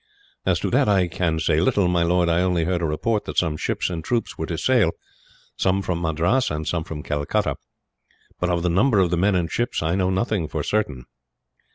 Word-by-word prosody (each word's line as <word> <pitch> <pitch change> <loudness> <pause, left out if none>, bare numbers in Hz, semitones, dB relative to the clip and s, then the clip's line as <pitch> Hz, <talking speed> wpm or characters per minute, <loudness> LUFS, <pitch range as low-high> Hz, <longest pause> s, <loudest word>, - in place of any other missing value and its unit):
"As - - +2
to - - -1
that 135 -6 +3
I 95 -3 +3
can 80 -1 -1
say 80 -1 +1
little, 90 +2 +2
my 90 -1 +2
lord. 85 +1 +2
I 85 +1 +2
only 90 -2 +1
heard 90 +1 -1
a - - 0
report 105 +8 -1
that - - -6
some 80 -4 +2
ships - - -2
and 85 -3 -4
troops 115 +6 -2
were 80 - -4
to 85 - -3
sail 115 -4 +2 0.6
some 95 +1 +1
from 90 -3 -2
Madras 85 +10 +1
and 75 0 -4
some 85 -2 -1
from 75 -2 -7
Calcutta 75 -1 -1 0.8
but 90 - 0
of 85 -1 0
the - - +1
number 105 +7 +3
of 90 -3 +3
the 90 - +1
men 100 +3 +2
and 85 -3 -1
ships, 120 -8 -1
I 80 +1 0
know 95 -1 +1
nothing 95 -2 0
for - - -3
certain." 75 - -1
90 Hz, 220 wpm, -23 LUFS, 80-95 Hz, 0.8 s, that